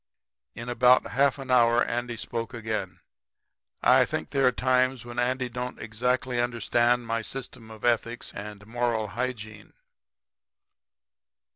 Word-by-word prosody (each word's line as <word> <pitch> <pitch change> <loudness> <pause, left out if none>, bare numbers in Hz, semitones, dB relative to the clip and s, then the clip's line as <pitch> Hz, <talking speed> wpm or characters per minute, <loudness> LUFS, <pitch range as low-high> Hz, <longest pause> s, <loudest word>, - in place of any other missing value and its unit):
"In 115 - -7
about 125 +1 +4
half 140 +1 +3
an 135 -2 -6
hour 120 -1 +5
Andy 120 0 -3
spoke 115 +1 -5
again. 110 -5 -4 0.8
I - - +6
think 80 - -4
there 135 -2 +3
are - - +5
times 130 0 +1
when 120 0 -5
Andy 125 +1 0
don't 125 +1 -5
exactly 125 +3 -1
understand 120 0 +1
my 115 0 -1
system 125 -1 -8
of 110 +1 -8
ethics 120 0 0
and 105 0 -8
moral 115 -2 -1
hygiene. 110 -2 -5
120 Hz, 130 wpm, -27 LUFS, 115-125 Hz, 0.8 s, I